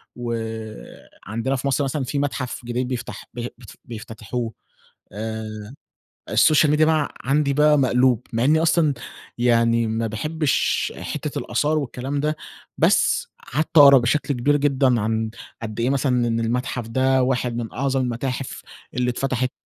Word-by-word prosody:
وعندنا 115 +1 -5
في 135 +1 -3
مصر 140 +1 +1
مثلًا 135 +1 -2
في 140 +3 -2
متحف 135 -3 -3
جديد 125 +1 -2
بيفتح 125 -1 -5
بي 120 0 -4
بت 120 -3 -13
بيفتتحوه، 115 +1 -5 0.6
آآ، 110 +1 -6 0.6
السوشيال 155 -1 +5
ميديا 155 +1 +4
بقى 155 -2 +1
عندي 140 +1 +1
بقى 150 +1 +4
مقلوب، 125 -2 +2
مع 115 +1 +1
إني 155 +4 +4
أصلًا، 165 -3 +3 0.4
يعني 115 -1 +3
ما 110 +1 -1
باحبش 150 +7 0
حتة - - -4
الآثار 155 +1 0
والكلام 135 0 -3
ده، 150 +2 0 0.4
بس - - +3 0.3
قعدت 155 +3 0
اقرا 140 -1 +10
بشكل 135 +4 +1
كبير 140 +4 +2
جدًا 135 -4 +2
عن 110 +1 -1 0.3
قد 110 -1 -5
إيه 120 +2 +1
مثلًا 125 -3 +1
إن 115 0 0
المتحف 120 0 -2
ده 130 +2 +2
واحد 125 -2 0
من 115 -2 -4
أعظم 135 +1 0
المتاحف 125 +2 -3 0.3
اللي 125 0 0
اتفتحت. 130 0 -1
125 Hz, 145 wpm, -22 LUFS, 115-140 Hz, 0.6 s, اقرا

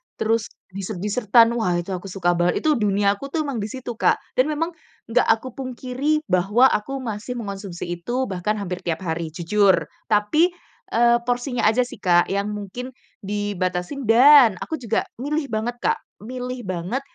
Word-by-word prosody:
terus 220 -1 0 0.2
dessert-desert-an. 210 +4 +2
Wah, 180 -6 +1
itu 175 - -11
aku 185 0 -4
suka 180 -2 0
banget, 175 +1 +1
itu 305 -2 +3
duniaku 205 +4 0
tuh 320 - +1
emang 280 -4 -3
di 205 - -2
situ, 240 -1 -7
Kak. - - +2 0.2
Dan 255 - +5
memang 315 +2 -1 0.4
nggak 245 +2 +3
aku 225 +2 0
pungkiri 265 +3 -2
bahwa 200 +8 +4
aku 270 +6 -2
masih 225 0 -5
mengonsumsi 200 -6 -6
itu 245 +9 -2
bahkan 190 +2 -1
hampir 180 -2 -3
tiap 170 +1 -2
hari, 160 -2 -3
jujur 190 +1 +2 0.2
tapi, 230 - +3 0.4
eee, 235 +1 +5
porsinya 245 +1 -1
aja 225 +3 +3
sih 245 - -9
Kak, 175 -3 +3
yang 200 +1 0
mungkin 210 +6 -6 0.3
dibatasin, 205 +4 -2
dan 250 0 +8
aku 320 - -4
juga 230 -3 0 0.2
milih 290 +2 -2
banget 225 +2 -2
Kak, 455 +1 +2 0.3
milih 250 +1 -5
banget, 185 +7 -3
220 Hz, 160 wpm, -22 LUFS, 195-255 Hz, 0.4 s, dan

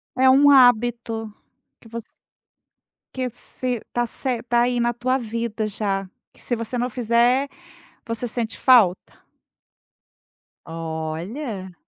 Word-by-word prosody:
É 260 +1 +5
um 285 +2 +6
hábito 235 -4 +3 0.5
que 225 - -16
voc 230 0 -6 1.1
que 255 -1 -2
se 250 +1 -4
está 240 +2 -3
ce 260 +3 -3
está 240 0 -1
aí 245 -1 0
na 235 0 +2
tua 255 +3 0
vida 230 -2 -3
já. 195 -2 -2 0.2
Que - - -14
se 240 - -1
você 230 +2 -4
não 245 - -1
fizer, 245 +3 +2 0.6
você 230 +1 -2
sente 230 -1 -3
falta? 220 -9 +4 1.5
Olha. 165 - -5
235 Hz, 120 wpm, -22 LUFS, 215-250 Hz, 1.5 s, um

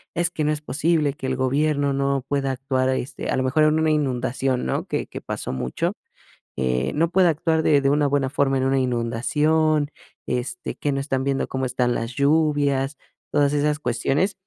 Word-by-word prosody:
"Es 170 0 +1
que 155 - -2
no 150 - +2
es 150 -1 -2
posible 150 0 +1
que 135 - -6
el 130 - 0
gobierno 140 +2 +1
no 140 -1 0
pueda 140 -1 0
actuar", 130 0 -1
este, 130 0 -3
a - - +1
lo 130 - +1
mejor 140 +4 +2
en 155 +1 +3
una 160 0 +2
inundación, 130 -3 0
¿no? - - -1
Que - - -2
que - - -8
pasó - - -5
mucho, 65 -1 -2 0.7
eh, 65 +1 0
no 165 +2 +1
puede 180 0 +4
actuar 160 0 +1
de 145 -3 +4
de 135 - +3
una 145 +1 +3
buena 140 -1 0
forma 140 -1 +1
en 130 - +1
una 135 0 +2
inundación, 145 +6 +1 0.4
este, 125 0 -3
que 145 - -1
no 135 - -1
están 135 -1 -1
viendo 135 -1 -1
cómo 130 0 -2
están 125 -1 0
las 115 +1 -3
lluvias, 145 -1 +2 0.3
todas 145 -1 +2
esas 150 0 +1
cuestiones. 135 - 0
140 Hz, 195 wpm, -23 LUFS, 130-150 Hz, 0.7 s, puede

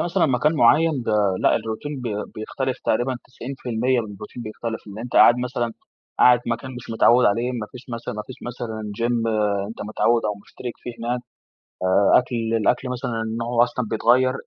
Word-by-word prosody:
مثلًا 175 0 +2
مكان 135 +3 +2
معيّن 150 +3 +4
ب - - -7 0.3
لأ، - - +4
الروتين 130 +6 -5
بي 120 -4 -3 0.2
بيختلف، 130 +4 -3
تقريبًا 125 +3 +1
90% 125 -1 -2
من 110 - -5
الروتين 105 +4 -9
بيختلف. 110 +1 -5
إن 100 0 -9
أنت 120 +2 -7
قاعد 120 - +7
مثلًا، 125 -2 -2 0.5
قاعد 125 -1 +6
مكان 115 +2 -3
مش 125 -1 -9
متعوّد 120 +2 +5
عليه، 115 +5 +1
ما 115 -4 -4
فيش 125 0 -11
مثلًا 115 -2 -5
ما 105 - -4
فيش 130 - -9
مثلًا 110 -3 -5
gym 120 -1 +1 0.4
أنت 115 - -7
متعوّد 115 +2 +2
أو 105 -1 0
مشترِك 120 +3 -7
فيه 120 - -5
هناك. 120 +2 -2 0.6
آآ، 95 +2 +5
أكل 125 0 -4 0.2
الأكل 120 +3 +1
مثلًا 125 -1 -3 0.3
نوعه 120 +1 +2
أصلًا 120 0 -2
بيتغير، 125 +4 +3
120 Hz, 175 wpm, -23 LUFS, 115-125 Hz, 0.6 s, قاعد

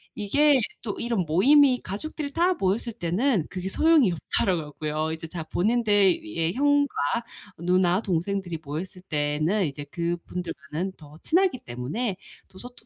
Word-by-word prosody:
이게 280 +7 +3 0.2
또 215 -3 -4
이런 230 -6 -1
모임이 255 - +5
가족들 285 - -5
다 350 +4 +2
모였을 210 - -1
때는 190 - 0
그게 185 0 -4
소용이 310 - +4
없더라고 165 -2 -1
고요. 155 +1 -2
이제 160 0 -7
자 165 0 -6
본인들의 190 - +1
형과 285 +1 +2 0.6
누나 180 +2 +2
동생들이 185 -2 -2
모였을 170 +6 -6
때에는 155 +5 0
이제 145 0 -6
그분들과는 170 0 -4
더 150 -1 -14
친하기 355 -5 +2
때문에 165 - -4 0.3
더 190 - -16
소토 245 0 -11
185 Hz, 310 characters per minute, -25 LUFS, 160-240 Hz, 0.6 s, 모임이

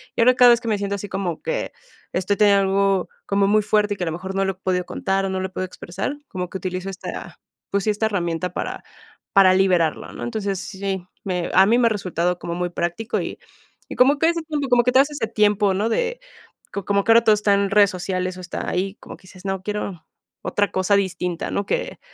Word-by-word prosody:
y - - +1
ahora 250 +2 +6
cada 245 -1 +8
vez 235 0 +3
que 235 - -7
me 215 - +1
siento 200 0 -2
así 200 0 -6
como 190 -3 -3
que - - -3 0.4
estoy 190 +2 0
teniendo 200 -1 +5
algo 195 -1 +1 0.2
como 200 0 +2
muy 215 +1 +4
fuerte 210 0 +1
y - - -17
que 180 - -3
a - - -5
lo 160 - -2
mejor 190 +3 -6
no 195 0 +1
lo 195 - 0
he - - -25
podido 185 -1 -1
contar 195 +1 -1
o - - -2
no 190 0 -2
lo 190 - -2
he - - -15
podido 185 0 -3
expresar, 180 +9 -5
como 180 -2 -5
que 190 - -5
utilizo 185 0 -4
esta, 190 - -7 0.3
pues 200 0 0
sí, - - +1
esta 210 +1 0
herramienta 180 -3 -2
para - - -4 0.5
para 190 -1 +7
liberarlo, 180 -4 +2
¿no? - - -7
Entonces, 205 -5 -2
sí, 190 -2 -4 0.2
me 180 -3 -2
a 190 +1 +7
mí 230 +3 +4
me 245 - +3
ha - - +3
resultado 180 -4 -1
como 170 - -4
muy 180 0 -2
práctico, 175 +6 -2
y - - -6 0.5
y - - -6
como 270 +4 +5
que 325 - +4
ese 340 0 -1
tiempo, 300 -3 -2
como 245 -1 +5
que 250 - +2
te 260 - +6
das 280 +2 +3
ese 290 -6 -2
tiempo, 210 -2 +2
¿no? 205 +4 0
de, 485 - -1 0.5
co 200 - -3
como 200 0 +1
que 225 - +3
ahora 230 0 +6
todo 215 -2 +5
está 205 -1 +2
en 200 0 +1
redes 205 -1 +6
sociales 185 0 -3
o - - -8
está 175 - -5
ahí, 190 +2 -2
como - - -11
que - - -26
dices, 185 0 -15
no, 190 -1 -2
quiero 200 -5 -4 0.4
otra 205 0 0
cosa 185 +2 +2
distinta, 180 -3 -2
¿no? 200 - -1
Que - - -2
195 Hz, 245 wpm, -22 LUFS, 185-215 Hz, 0.5 s, cada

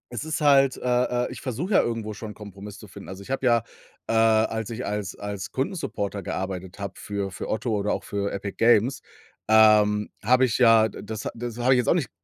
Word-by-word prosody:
Es 120 - -4
ist 155 -1 -3
halt, 135 -2 +5
äh, - - -12 0.5
äh, - - -9
ich - - -8
versuche 145 - -3
ja - - +7
irgendwo 115 -2 -3
schon, 105 +1 -7
'n - - -10
Kompromiss 100 -1 -10
zu 105 - -13
finden. 100 - -11
Also, 95 +1 -8
ich 115 - -9
habe 135 0 -1
ja 120 -2 +4 0.4
äh, - - -2
als 110 0 +2
ich 120 +2 -5
als 105 -2 -3
als 100 -1 -6
Kundensupporter 120 - -3
gearbeitet 95 0 -5
habe 100 -1 -5
für 100 -1 -4
für 95 - -6
Otto 110 +2 -2
oder 105 0 0
auch - - -4
für 100 0 -2
Epic 100 0 -5
Games, 120 +4 +3 0.5
ähm, 105 -1 +5
habe 125 +5 +4
ich 120 -3 +2
ja 115 -3 +5
das 105 +1 -6
das 120 0 -6
habe 125 +2 +4
ich - - +3
jetzt 125 - 0
auch - - +5
nicht - - -1
110 Hz, 220 wpm, -25 LUFS, 100-120 Hz, 0.5 s, ja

